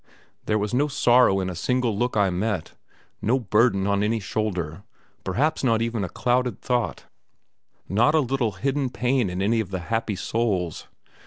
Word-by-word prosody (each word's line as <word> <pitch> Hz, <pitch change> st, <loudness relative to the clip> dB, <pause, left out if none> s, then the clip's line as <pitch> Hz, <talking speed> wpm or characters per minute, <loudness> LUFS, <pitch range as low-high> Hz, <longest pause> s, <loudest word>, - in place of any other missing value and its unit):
There 105 Hz, -, +2 dB
was 105 Hz, +2 st, -2 dB
no 140 Hz, +4 st, +2 dB
sorrow 125 Hz, -7 st, +4 dB
in 95 Hz, -, -2 dB
a 95 Hz, -, -3 dB
single 120 Hz, +5 st, 0 dB
look 120 Hz, +2 st, -1 dB
I 100 Hz, -2 st, +3 dB
met, 95 Hz, -1 st, -2 dB, 0.5 s
no 120 Hz, +5 st, +2 dB
burden 105 Hz, -3 st, +2 dB
on 100 Hz, 0 st, +1 dB
any 110 Hz, +2 st, +1 dB
shoulder, 95 Hz, -6 st, -3 dB, 0.4 s
perhaps 140 Hz, +13 st, 0 dB
not 115 Hz, -3 st, +2 dB
even 115 Hz, -3 st, -2 dB
a 90 Hz, -, -3 dB
clouded 125 Hz, +2 st, 0 dB
thought, 125 Hz, -1 st, -2 dB, 0.8 s
not 120 Hz, -, +3 dB
a -, -, +5 dB
little 130 Hz, -5 st, 0 dB
hidden 135 Hz, +6 st, -1 dB
pain 125 Hz, -3 st, 0 dB
in 90 Hz, +2 st, -2 dB
any 115 Hz, +3 st, +2 dB
of 110 Hz, -5 st, -2 dB
the 95 Hz, -, -3 dB, 0.2 s
happy 115 Hz, -2 st, 0 dB
souls. 95 Hz, -5 st, -2 dB
110 Hz, 170 wpm, -24 LUFS, 95-125 Hz, 0.8 s, a